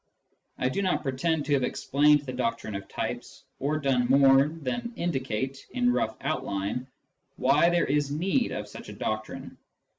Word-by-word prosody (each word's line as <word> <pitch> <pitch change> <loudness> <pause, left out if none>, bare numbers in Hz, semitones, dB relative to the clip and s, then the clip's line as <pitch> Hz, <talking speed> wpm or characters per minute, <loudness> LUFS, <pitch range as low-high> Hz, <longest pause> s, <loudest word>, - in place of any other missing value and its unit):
I 130 - 0
do 130 +10 -1
not 185 -2 0
pretend 150 +3 0
to 145 - +1
have 140 - +3
explained 145 +3 +3
the 130 -3 -6
doctrine 230 - -2
of 100 0 -5
types, - - -5 0.2
or 145 +3 0
done 135 -4 +1
more 135 +1 +6
than 165 - -4
indicate, 135 - -3
in 245 -1 +2
rough - - -1
outline, 125 -4 -2 0.5
why 145 +6 +4
there 175 -1 +2
is 145 0 +1
need 190 - 0
of 105 0 -4
such - - -10
a - - -7
doctrine. 110 +1 -5
140 Hz, 160 wpm, -27 LUFS, 130-160 Hz, 0.5 s, more